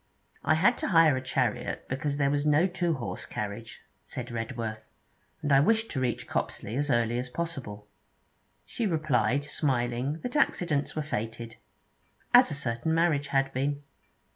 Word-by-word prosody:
'I 155 Hz, -, +3 dB
had 195 Hz, +10 st, +4 dB
to -, -, -1 dB
hire 165 Hz, -6 st, +5 dB
a 130 Hz, -, -2 dB
chariot 125 Hz, -2 st, -1 dB
because 140 Hz, +2 st, -2 dB
there 140 Hz, -1 st, +2 dB
was 145 Hz, 0 st, +1 dB
no 150 Hz, +3 st, +4 dB
two 175 Hz, -3 st, 0 dB
horse 125 Hz, -, -5 dB
carriage,' 105 Hz, +2 st, -6 dB, 0.2 s
said -, -, -7 dB
Redworth, 115 Hz, -1 st, -4 dB, 0.6 s
'and 145 Hz, -, 0 dB
I 135 Hz, -, +7 dB
wished 225 Hz, +9 st, +2 dB
to 135 Hz, -, -2 dB
reach 125 Hz, -2 st, -1 dB
Copsley 110 Hz, -, -3 dB
as 145 Hz, +2 st, -1 dB
early 120 Hz, -1 st, +2 dB
as 125 Hz, 0 st, -4 dB
possible.' 125 Hz, -11 st, -5 dB, 0.8 s
She 230 Hz, -, -2 dB
replied, 140 Hz, -, +1 dB
smiling, 130 Hz, 0 st, -1 dB
that 250 Hz, +3 st, -4 dB
accidents 165 Hz, -, +1 dB
were 155 Hz, -, -1 dB
fated. 115 Hz, -4 st, -5 dB, 0.8 s
As -, -, +8 dB
a 145 Hz, -, -2 dB
certain 130 Hz, +4 st, -1 dB
marriage 160 Hz, -4 st, +2 dB
had 135 Hz, -1 st, +1 dB
been! 140 Hz, +2 st, -1 dB
140 Hz, 160 wpm, -28 LUFS, 120-155 Hz, 0.8 s, As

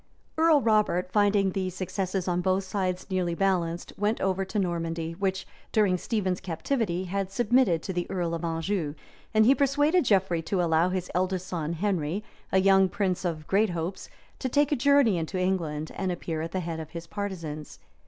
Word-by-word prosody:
{1142.} 275 Hz, -, +4 dB
Earl 180 Hz, -, +2 dB
Robert, 185 Hz, -, -21 dB
finding 205 Hz, -2 st, +3 dB
the 185 Hz, 0 st, -2 dB
successes 185 Hz, 0 st, -3 dB
on 180 Hz, 0 st, +1 dB
both 190 Hz, +1 st, +1 dB
sides 185 Hz, -2 st, -2 dB
nearly 180 Hz, -2 st, 0 dB
balanced, 175 Hz, -3 st, 0 dB
went 210 Hz, +2 st, +1 dB
over 190 Hz, 0 st, 0 dB
to 190 Hz, +3 st, -5 dB
Normandy, 165 Hz, -3 st, -1 dB
which, 190 Hz, +2 st, -2 dB, 0.3 s
during 205 Hz, -4 st, +3 dB
Stephen's 185 Hz, -1 st, -1 dB
captivity, 185 Hz, -, -2 dB
had 195 Hz, +1 st, -3 dB
submitted 215 Hz, -5 st, +2 dB
to 190 Hz, -, -4 dB
the 175 Hz, 0 st, -3 dB
earl 175 Hz, -3 st, -1 dB
of 165 Hz, 0 st, -3 dB
Anjou; 165 Hz, -1 st, -2 dB, 0.4 s
and 220 Hz, -1 st, +4 dB
he 260 Hz, -, +7 dB
persuaded 290 Hz, +5 st, +3 dB
Geoffrey 190 Hz, -6 st, +2 dB
to 180 Hz, +4 st, -2 dB
allow 165 Hz, 0 st, +3 dB
his 185 Hz, -1 st, -3 dB
eldest 185 Hz, 0 st, 0 dB
son, 165 Hz, -3 st, -3 dB
Henry, 180 Hz, 0 st, -1 dB, 0.3 s
a 190 Hz, -, +3 dB
young 195 Hz, 0 st, +5 dB
prince 190 Hz, -1 st, -1 dB
of 160 Hz, -4 st, -3 dB
great 205 Hz, +5 st, +2 dB
hopes, 170 Hz, +2 st, -4 dB, 0.3 s
to 260 Hz, -, -2 dB
take 290 Hz, +3 st, +2 dB
a -, -, +4 dB
journey 270 Hz, -7 st, +4 dB
into 165 Hz, +3 st, -3 dB
England, 165 Hz, -5 st, -1 dB
and 190 Hz, -1 st, -2 dB
appear 165 Hz, -2 st, -3 dB
at 165 Hz, +1 st, -4 dB
the 185 Hz, -, -2 dB
head 165 Hz, -1 st, -4 dB
of 160 Hz, -1 st, -7 dB
his 170 Hz, 0 st, -7 dB
partisans. 165 Hz, -7 st, -5 dB
185 Hz, 185 wpm, -27 LUFS, 170-205 Hz, 0.4 s, he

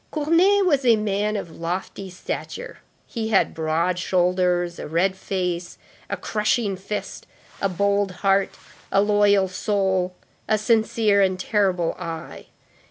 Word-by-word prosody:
Cournet 345 Hz, +6 st, +3 dB
was 285 Hz, -6 st, +2 dB
a 235 Hz, -2 st, +5 dB
man 210 Hz, 0 st, -1 dB
of 170 Hz, -6 st, -6 dB
lofty 185 Hz, +3 st, -4 dB
stature; 475 Hz, -, -6 dB, 0.3 s
he 225 Hz, -2 st, -4 dB
had 215 Hz, -3 st, +2 dB
broad 165 Hz, +3 st, 0 dB
shoulders, 180 Hz, -1 st, +1 dB
a -, -, -5 dB
red 175 Hz, +5 st, +1 dB
face, 180 Hz, -2 st, -3 dB, 0.3 s
a -, -, -2 dB
crushing 210 Hz, -1 st, 0 dB
fist, 195 Hz, +3 st, -6 dB, 0.3 s
a 195 Hz, -, +1 dB
bold 200 Hz, +2 st, +1 dB, 0.2 s
heart, 195 Hz, 0 st, +3 dB, 0.4 s
a 195 Hz, -, +3 dB
loyal 205 Hz, -2 st, +3 dB
soul, 190 Hz, -1 st, -1 dB, 0.3 s
a 215 Hz, -, +3 dB
sincere 220 Hz, -1 st, +2 dB
and 185 Hz, -1 st, +1 dB
terrible 185 Hz, -4 st, +1 dB
eye. 165 Hz, -3 st, -7 dB
195 Hz, 130 wpm, -23 LUFS, 180-210 Hz, 0.4 s, a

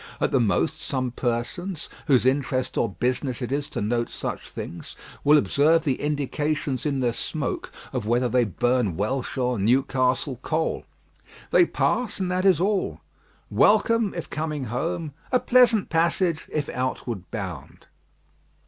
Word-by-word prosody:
At -, -, +1 dB
the 135 Hz, -, +3 dB
most, 115 Hz, +7 st, +1 dB
some 130 Hz, -3 st, -2 dB
persons, 130 Hz, +10 st, -3 dB, 0.2 s
whose 130 Hz, -5 st, +4 dB
interest 130 Hz, -1 st, +1 dB
or 115 Hz, -, +1 dB
business 125 Hz, +5 st, -1 dB
it 125 Hz, -1 st, -4 dB
is 145 Hz, +1 st, -1 dB
to -, -, -3 dB
note 120 Hz, +2 st, 0 dB
such -, -, -5 dB
things, 85 Hz, -, -8 dB, 0.3 s
will 150 Hz, +1 st, +6 dB
observe 155 Hz, +3 st, +3 dB
the 135 Hz, -5 st, -1 dB
indications 145 Hz, 0 st, -1 dB
in 140 Hz, -2 st, 0 dB
their 120 Hz, -2 st, +1 dB
smoke -, -, -3 dB, 0.2 s
of 120 Hz, -5 st, -2 dB
whether 120 Hz, +2 st, +2 dB
they 125 Hz, +1 st, +3 dB
burn 120 Hz, -2 st, 0 dB
Welsh 125 Hz, +7 st, -2 dB
or 125 Hz, -3 st, 0 dB
Newcastle 130 Hz, +2 st, +1 dB
coal. 160 Hz, +3 st, -1 dB, 0.7 s
They -, -, +6 dB
pass, 245 Hz, -4 st, 0 dB
and 185 Hz, -1 st, -1 dB
that 185 Hz, +1 st, 0 dB
is 185 Hz, -5 st, +5 dB
all. 195 Hz, +1 st, 0 dB, 0.5 s
"Welcome," 230 Hz, -3 st, +3 dB
if 170 Hz, -, -4 dB
coming 155 Hz, -2 st, -3 dB
home; 165 Hz, +2 st, -2 dB, 0.2 s
"a 255 Hz, -, +4 dB
pleasant 245 Hz, -5 st, +4 dB
passage," 170 Hz, 0 st, +1 dB
if 150 Hz, -2 st, -1 dB
outward 120 Hz, -6 st, -3 dB
bound. -, -, -7 dB
135 Hz, 150 wpm, -25 LUFS, 125-165 Hz, 0.7 s, will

